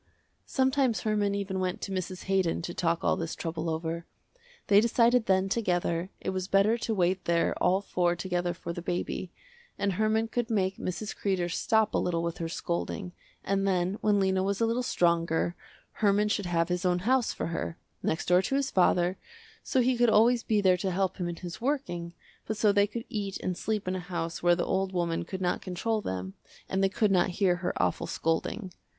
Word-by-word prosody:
Sometimes 260 Hz, -6 st, +2 dB
Herman 210 Hz, -2 st, +1 dB
even 195 Hz, -1 st, -2 dB
went 185 Hz, -1 st, -1 dB
to 195 Hz, -, -4 dB
Mrs. 185 Hz, -1 st, -4 dB
Haydon 190 Hz, -4 st, +1 dB
to 175 Hz, -, -4 dB
talk 165 Hz, -1 st, 0 dB
all -, -, +3 dB
this 165 Hz, -1 st, -4 dB
trouble 165 Hz, 0 st, -3 dB
over. 165 Hz, +1 st, -3 dB, 0.6 s
They 205 Hz, 0 st, +6 dB
decided 235 Hz, +1 st, +3 dB
then 190 Hz, 0 st, +3 dB
together, 175 Hz, -4 st, 0 dB
it -, -, -3 dB
was 185 Hz, -1 st, -3 dB
better 200 Hz, +3 st, +4 dB
to 225 Hz, -1 st, -1 dB
wait 185 Hz, 0 st, +1 dB
there 170 Hz, 0 st, +2 dB
all 190 Hz, +2 st, +3 dB
four 175 Hz, -3 st, 0 dB
together 175 Hz, -1 st, -2 dB
for 170 Hz, -, -6 dB
the 175 Hz, -, -5 dB
baby, 175 Hz, +1 st, -3 dB, 0.5 s
and 200 Hz, -1 st, 0 dB
Herman 220 Hz, +3 st, +1 dB
could 240 Hz, 0 st, -2 dB
make 195 Hz, -4 st, 0 dB
Mrs. 205 Hz, +4 st, -4 dB
Kreder 185 Hz, -3 st, -1 dB
stop 220 Hz, +3 st, +2 dB
a -, -, +2 dB
little 170 Hz, -2 st, 0 dB
with 170 Hz, 0 st, -3 dB
her 165 Hz, -1 st, -3 dB
scolding, 175 Hz, +2 st, -3 dB, 0.3 s
and 195 Hz, 0 st, 0 dB
then 185 Hz, +1 st, 0 dB
when 210 Hz, -1 st, +3 dB
Lena 190 Hz, -1 st, +2 dB
was 195 Hz, +1 st, -1 dB
a 230 Hz, -, +3 dB
little 230 Hz, +2 st, 0 dB
stronger, 170 Hz, -6 st, +1 dB, 0.4 s
Herman 210 Hz, 0 st, +2 dB
should 205 Hz, -3 st, -1 dB
have 170 Hz, 0 st, +1 dB
his 180 Hz, 0 st, -1 dB
own 180 Hz, -1 st, +2 dB
house 255 Hz, 0 st, +3 dB
for -, -, -4 dB
her, 165 Hz, -, -3 dB, 0.2 s
next 160 Hz, -, -1 dB
door 180 Hz, +1 st, +4 dB
to 270 Hz, -, -1 dB
his 275 Hz, -1 st, 0 dB
father, 180 Hz, 0 st, +3 dB, 0.4 s
so 260 Hz, -, +1 dB
he 250 Hz, +1 st, +2 dB
could 240 Hz, 0 st, +4 dB
always 235 Hz, +3 st, +5 dB
be 215 Hz, -2 st, +1 dB
there 185 Hz, -2 st, +4 dB
to 190 Hz, -, -2 dB
help 190 Hz, 0 st, 0 dB
him 175 Hz, -2 st, -2 dB
in 170 Hz, -, -4 dB
his 175 Hz, +2 st, -8 dB
working, 230 Hz, -11 st, -2 dB, 0.3 s
but 220 Hz, -, -2 dB
so 210 Hz, -1 st, +4 dB
they 200 Hz, 0 st, +3 dB
could 230 Hz, +3 st, -6 dB
eat 200 Hz, -3 st, -3 dB
and 185 Hz, -, -2 dB
sleep 210 Hz, +1 st, -2 dB
in 185 Hz, -, 0 dB
a -, -, -2 dB
house 170 Hz, -2 st, -4 dB
where 175 Hz, 0 st, +4 dB
the 175 Hz, -, -1 dB
old 190 Hz, 0 st, 0 dB
woman 170 Hz, -2 st, -1 dB
could 190 Hz, +2 st, -6 dB
not 180 Hz, -1 st, 0 dB
control 210 Hz, +4 st, -2 dB
them 95 Hz, -, -4 dB, 0.3 s
and 190 Hz, 0 st, 0 dB
they 195 Hz, -, +4 dB
could 205 Hz, +1 st, +1 dB
not 185 Hz, -1 st, +3 dB
hear 185 Hz, -3 st, +3 dB
her 180 Hz, 0 st, -2 dB
awful -, -, 0 dB
scolding. 180 Hz, +4 st, -2 dB
190 Hz, 205 wpm, -29 LUFS, 175-210 Hz, 0.6 s, They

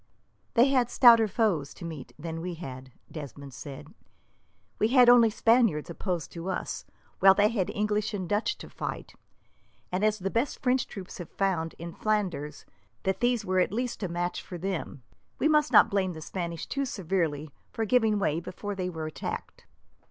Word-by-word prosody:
"They 245 Hz, +3 st, +6 dB
had 255 Hz, -3 st, +2 dB
stouter 230 Hz, -4 st, +7 dB
foes 195 Hz, -, 0 dB
to -, -, -9 dB
meet 160 Hz, -5 st, -7 dB
than 165 Hz, +1 st, -5 dB
we 175 Hz, 0 st, -4 dB
had," 130 Hz, -5 st, -8 dB, 0.2 s
Desmond 140 Hz, -2 st, -8 dB
said. 145 Hz, +5 st, -9 dB, 0.9 s
"We 215 Hz, -, +4 dB
had 250 Hz, 0 st, +6 dB
only 240 Hz, -2 st, +7 dB
Spaniards 220 Hz, -8 st, +2 dB
opposed 175 Hz, -1 st, -3 dB
to 170 Hz, +2 st, -6 dB
us, -, -, -4 dB, 0.3 s
while 195 Hz, 0 st, +7 dB
they 205 Hz, +1 st, +4 dB
had 205 Hz, -6 st, -1 dB
English 210 Hz, 0 st, -1 dB
and 190 Hz, -4 st, -4 dB
Dutch 205 Hz, +5 st, 0 dB
to -, -, -10 dB
fight; -, -, -5 dB, 0.8 s
and 185 Hz, +3 st, -1 dB
as 215 Hz, 0 st, +3 dB
the 195 Hz, -1 st, -3 dB
best 235 Hz, +5 st, -1 dB
French 255 Hz, -1 st, +2 dB
troops 190 Hz, -2 st, -9 dB
have 175 Hz, -, -7 dB
found, 175 Hz, -5 st, -1 dB
in 170 Hz, 0 st, -7 dB
Flanders, 180 Hz, -9 st, -2 dB, 0.4 s
that 190 Hz, 0 st, 0 dB
these 240 Hz, -3 st, +1 dB
were 185 Hz, 0 st, +1 dB
at 180 Hz, -, +2 dB
least 240 Hz, +2 st, -3 dB
a 190 Hz, -, -1 dB
match 175 Hz, +1 st, -2 dB
for 180 Hz, -, -8 dB
them, 170 Hz, -7 st, -4 dB, 0.3 s
we -, -, +2 dB
must 300 Hz, -1 st, +3 dB
not -, -, +7 dB
blame 190 Hz, -2 st, 0 dB
the 160 Hz, -, -9 dB
Spanish 170 Hz, -1 st, -4 dB
too 275 Hz, 0 st, -2 dB
severely 165 Hz, -, -2 dB, 0.2 s
for 225 Hz, -, -2 dB
giving 220 Hz, -2 st, +3 dB
way 160 Hz, -5 st, 0 dB
before 185 Hz, +4 st, -6 dB
they 185 Hz, -2 st, -3 dB
were 160 Hz, -3 st, -5 dB
attacked." 155 Hz, -, -6 dB
190 Hz, 180 wpm, -28 LUFS, 165-220 Hz, 0.9 s, stouter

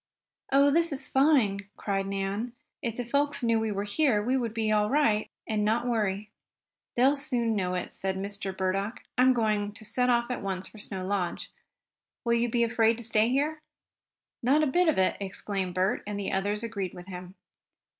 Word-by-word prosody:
"Oh, 280 Hz, +1 st, +5 dB
this 335 Hz, +2 st, +3 dB
is 275 Hz, -, -3 dB
fine!" 235 Hz, -9 st, +3 dB
cried 195 Hz, -1 st, -1 dB
Nan. 195 Hz, +4 st, -2 dB, 0.3 s
"If 235 Hz, -5 st, -3 dB
the 245 Hz, -, -3 dB
folks 280 Hz, +2 st, 0 dB
knew 230 Hz, -1 st, +3 dB
we 220 Hz, -1 st, -1 dB
were 200 Hz, 0 st, -2 dB
here 220 Hz, +2 st, +2 dB
we 250 Hz, +4 st, +1 dB
would 240 Hz, -4 st, 0 dB
be 220 Hz, -1 st, 0 dB
all 210 Hz, 0 st, +3 dB
right, 240 Hz, -7 st, +2 dB, 0.2 s
and 215 Hz, -1 st, 0 dB
not 225 Hz, +3 st, +1 dB
worry." 210 Hz, -3 st, -1 dB, 0.6 s
"They'll 265 Hz, +4 st, +4 dB
soon 245 Hz, -6 st, 0 dB
know 185 Hz, -2 st, 0 dB
it," 180 Hz, -, -3 dB
said 190 Hz, 0 st, -3 dB
Mr. 200 Hz, 0 st, -4 dB
Burdock. 195 Hz, +4 st, -1 dB
"I'm 255 Hz, +1 st, +5 dB
going 215 Hz, -4 st, +1 dB
to 215 Hz, -, -9 dB
set 250 Hz, +3 st, 0 dB
off 240 Hz, 0 st, +2 dB
at 250 Hz, -, -3 dB
once 190 Hz, -1 st, -3 dB
for 215 Hz, -, -12 dB
Snow 190 Hz, -2 st, -4 dB
Lodge. 190 Hz, -3 st, -2 dB, 0.7 s
Will 235 Hz, -, +3 dB
you 235 Hz, +1 st, +2 dB
be 235 Hz, +1 st, +2 dB
afraid 225 Hz, 0 st, +3 dB
to 235 Hz, -, -7 dB
stay 220 Hz, 0 st, +3 dB
here?" 295 Hz, +4 st, 0 dB, 0.8 s
"Not 280 Hz, +6 st, +3 dB
a -, -, +4 dB
bit 350 Hz, +5 st, +2 dB
of 315 Hz, -, +3 dB
it!" 190 Hz, 0 st, +2 dB
exclaimed 195 Hz, -1 st, -3 dB
Bert, 185 Hz, +2 st, +1 dB
and 205 Hz, -1 st, -3 dB
the 200 Hz, -, -2 dB
others 205 Hz, +3 st, -1 dB
agreed 200 Hz, -6 st, -4 dB
with 180 Hz, 0 st, -9 dB
him. 180 Hz, 0 st, -9 dB
220 Hz, 195 wpm, -28 LUFS, 195-250 Hz, 0.8 s, Oh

